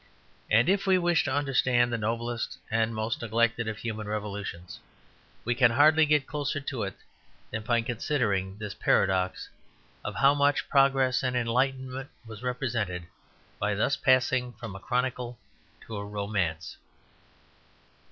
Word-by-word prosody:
And 115 +6 +4
if 195 +1 +2
we 190 -1 +5
wish 175 -2 +2
to - - -1
understand 130 -4 +2
the - - +1
noblest 115 +2 -2
and 115 0 +1
most 110 +2 -2
neglected 115 0 +1
of 110 -1 -3
human 110 -2 -5
revolutions, 100 -4 -5 0.7
we 120 - +1
can 120 0 +5
hardly 155 +5 +5
get 150 -2 +3
closer 145 -1 -2
to 135 -4 -4
it 95 -1 -3 0.6
than 110 - -3
by 120 +1 +1
considering 110 -6 -1
this 105 -2 -5
paradox, 95 -3 +1 0.6
of - - -5
how 140 +1 +5
much 145 0 +2
progress 135 -2 +3
and 125 -1 -1
enlightenment 130 +2 -1 0.2
was 110 -1 -10
represented 115 -8 -2 0.5
by 105 0 0
thus 125 +7 +1
passing 130 -2 +2
from 115 -5 -8
a - - -7
chronicle 125 +1 -2 0.4
to 110 - -8
a 100 - -4
romance. 100 -5 -3
120 Hz, 140 wpm, -28 LUFS, 105-130 Hz, 0.7 s, we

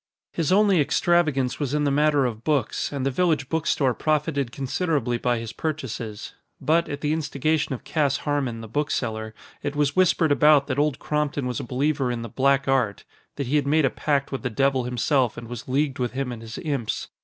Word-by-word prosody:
His 165 0 0
only 195 -3 +5
extravagance 150 -5 +1
was 145 -1 -1
in 150 - +1
the 145 - +2
matter 145 -1 +3
of 115 -2 -4
books, 150 -4 0
and 140 -2 -3
the 135 - +1
village 155 -3 +1
book 160 -1 -1
store 130 -4 +2
profited 150 -3 0
considerably 135 -2 -1
by 120 0 +1
his 115 -1 -6
purchases. 125 -9 -5 0.3
But, 165 +2 +2
at 145 +1 -5
the 150 0 +1
instigation 155 -1 0
of - - -11
Cass 145 -4 +1
Harmon, 135 -6 -1
the 115 - -8
bookseller, 110 -4 -2 0.3
it 145 0 -3
was 145 -1 +1
whispered 180 -4 +3
about 150 -1 +5
that 135 0 -2
Old 145 -2 +1
Crompton 150 -2 -1
was 125 -1 -2
a - - -4
believer 135 +2 0
in 120 -1 -3
the 115 - -6
black 140 +3 +2
art 125 -7 +1 0.3
that 140 - -3
he 140 +5 +1
had 140 -1 0
made 155 +1 +3
a 135 - +1
pact 140 -2 -1
with 135 - -3
the 125 - -2
devil 135 +1 +1
himself 125 0 +1
and 120 -1 -7
was 120 -1 -7
leagued 135 +1 0
with 125 -1 -1
him 130 -1 -2
and 115 -2 -7
his 115 0 -8
imps. 140 -8 -2
140 Hz, 210 wpm, -24 LUFS, 125-150 Hz, 0.3 s, only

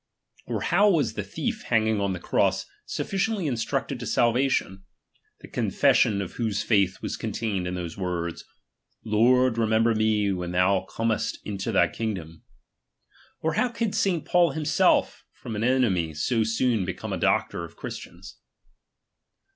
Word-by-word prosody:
Or - - -2
how 200 +4 +4
was 145 - +2
the 105 - -3
thief 215 - -4
hanging 110 -3 +2
on 100 -1 0
the 90 - -5
cross - - +1 0.2
sufficiently 195 -1 -1
instructed 135 +1 -2
to 115 - -5
salvation, 120 -6 +1 0.6
the - - -11
confession 100 -2 +2
of 90 - -7
whose 110 -4 -1
faith 100 -4 +1
was - - -2
contained 100 -6 -3
in 90 - -3
these 85 0 -6
words: 85 -2 -3 0.6
Lord, 120 +2 +3
remember 110 +1 +3
me 110 -2 +1
when 90 -2 -3
thou 95 +1 +2
earnest 115 -1 0
into 100 +1 -3
thy 90 -4 +4
kingdom? 90 -7 -5 1.0
Or 160 0 0
how 250 - +1
could 230 -3 -2
St. 180 -5 0
Paul 175 -4 +3
himself, 155 -1 +2
from 110 - -7
an 105 - -2
enemy, 105 - +1
so 110 +10 +1
soon 115 -1 +1
become 90 -1 -5
a - - -1
doctor 85 - +1
of 85 - -10
Christians - - -9
110 Hz, 145 wpm, -26 LUFS, 95-130 Hz, 1.0 s, how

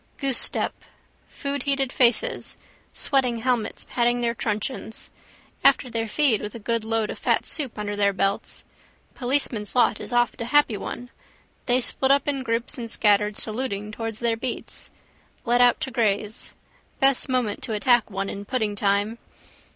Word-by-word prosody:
Goosestep. 270 -4 +1 0.6
Foodheated 280 -1 -2
faces, 255 - +2 0.3
sweating 255 -5 +1
helmets, 240 -1 -1
patting 240 0 +1
their 235 -1 +1
truncheons. 220 +1 -3 0.5
After 250 - +4
their 225 0 -1
feed 250 -2 +3
with 210 +1 -6
a - - -6
good 230 +1 -1
load 225 -1 0
of - - -8
fat - - +1
soup 280 -8 -3
under 205 -1 -3
their 200 -1 +3
belts. 195 +1 -2 0.5
Policeman's 245 -5 0
lot 245 - +3
is - - -4
oft 240 0 +1
a - - -2
happy 290 -2 +3
one. 245 +4 -6 0.6
They 250 0 +4
split 265 +2 0
up 280 +1 +3
in 280 -2 0
groups 235 +2 -2
and 230 -1 -5
scattered, 210 -1 +2
saluting, 215 -3 -3
towards 225 0 -4
their 235 -1 +1
beats. 240 +2 -5 0.6
Let 245 +1 +3
out 245 -1 +5
to 270 -4 -2
graze. 215 -2 -1 0.4
Best 270 0 +3
moment 250 -5 0
to 225 - -3
attack 240 +2 +3
one 195 -1 -3
in 200 - -5
pudding 215 -2 -1
time. 205 +3 0
235 Hz, 155 wpm, -24 LUFS, 210-255 Hz, 0.6 s, out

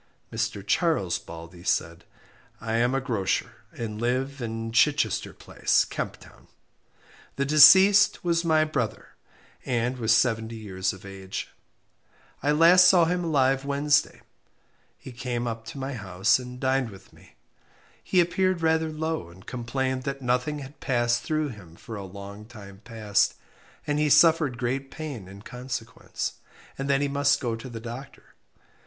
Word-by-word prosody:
Mr. 110 -3 -3
Charles 105 - +1
Baldey 85 +1 -11
said 85 -2 -1 0.5
I 115 0 -2
am 120 +3 +2
a - - +2
grocer, 115 -8 -2
and 110 -2 -6
live 130 +3 -1
in 115 -1 -4
Chichester 120 -2 +2
Place, - - 0
Kemp - - -5
Town. - - -18 0.9
The 140 - -1
deceased 190 +8 +7
was 170 -1 +1
my 160 -2 +3
brother, 140 -8 -3 0.5
and 125 0 -1
was 110 -2 +1
seventy 115 -1 +2
years 95 -4 -3
of 95 +1 -12
age. 95 -1 -6 0.9
I 145 - +1
last 170 +4 +7
saw 180 -2 +6
him 180 +2 -1
alive 135 -4 +2
last 135 - -13
Wednesday. 145 +1 +1 0.8
He 130 - -11
came 120 0 -3
up 115 -1 -5
to 115 - -9
my 135 +1 -4
house 100 0 +1
and 125 0 -9
dined 130 -2 0
with 95 -2 -15
me. - - -20 0.7
He 185 - +3
appeared 180 0 0
rather 160 0 +2
low, 155 - -3
and 90 +2 -16
complained 130 +2 -2
that 135 0 -3
nothing 125 +4 0
had 140 +3 -15
passed 120 -2 +1
through 155 -2 -1
him 95 -9 -12
for 110 +5 -9
a 100 -1 -6
long 100 +2 -10
time 100 -4 -12
past, 105 -3 0 0.5
and 145 0 0
he 150 0 +2
suffered 155 -3 +4
great 130 +3 -2
pain 140 -12 -7
in 100 +2 -12
consequence; 125 -2 -6 0.4
and 135 +1 -4
that 140 0 +3
he 145 - +1
must 140 +1 +2
go 120 -4 -2
to 115 +3 -9
the 115 -2 -7
doctor. 120 +4 -10
125 Hz, 155 wpm, -26 LUFS, 110-145 Hz, 0.9 s, deceased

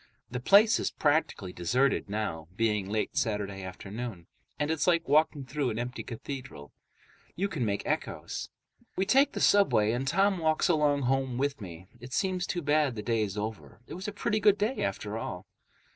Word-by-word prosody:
The 125 - -3
place 205 - +5
is - - 0
practically 145 - 0
deserted 125 +9 +1
now, 100 -7 -3
being 105 -3 0
late 110 +1 -1
Saturday 105 -6 -1
afternoon, 95 +1 -7 0.3
and 150 +1 0
it's 160 +2 0
like 170 -2 +3
walking 150 -1 +3
through 140 -1 -1
an 110 - -3
empty 120 +2 -4
cathedral. 120 - -8 0.6
You 195 +3 0
can 160 -10 -3
make 100 -2 -1
echoes. - - -3 0.5
We 190 - +1
take 270 +8 +4
the - - -3
subway, 110 - +4
and 125 +3 -2
Tom 195 +4 +2
walks 160 +1 +2
along 150 -4 +2
home 130 -1 0
with 140 -1 -1
me. 90 -2 -9
It 125 +2 -10
seems 185 +1 0
too 175 -2 -2
bad 145 -3 +2
the 105 - -5
day's 110 -4 -1
over. 110 0 -5
It - - -9
was 185 +4 -6
a - - -2
pretty 210 +1 -1
good 205 -1 +5
day, 215 +6 -1
after - - -3
all. - - -6
135 Hz, 180 wpm, -29 LUFS, 110-165 Hz, 0.6 s, place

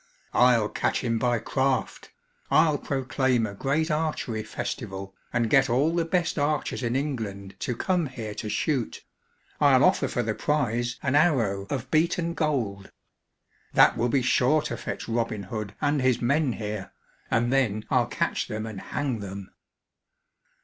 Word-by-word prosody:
"I'll 120 -3 +5
catch - - -1
him 115 -2 0
by 120 0 +2
craft. 130 +4 -1 0.4
I'll 155 -2 +4
proclaim 130 -3 0
a 105 - -5
great 150 - 0
archery 150 -8 -1
festival, 95 -3 -5 0.2
and 115 -1 +1
get 135 +2 +4
all 140 +7 +2
the 170 -1 +1
best 170 -1 0
archers 145 -1 0
in 120 0 -1
England 110 -9 -3
to 125 - -2
come 175 +4 0
here 115 -5 -6
to 105 - -5
shoot. 130 -1 -1 0.6
I'll - - +5
offer - - +3
for - - -1
the - - -1
prize 120 -5 0
an 130 - 0
arrow 120 - +2
of 130 -2 -4
beaten 170 +2 +1
gold. 120 -12 -2 0.8
That - - +6
will 120 +2 0
be 130 +1 +2
sure 135 +5 +3
to - - -3
fetch - - -5
Robin 115 -3 -1
Hood 105 +1 -5
and 145 -1 +1
his 130 -2 +2
men 140 +2 +1
here, 105 -3 -5 0.4
and 120 +2 +1
then 110 -6 +1
I'll - - +3
catch - - -1
them 110 +1 -4
and 105 -4 -7
hang 135 -6 -2
them." 100 -1 -7
125 Hz, 155 wpm, -26 LUFS, 110-145 Hz, 0.8 s, That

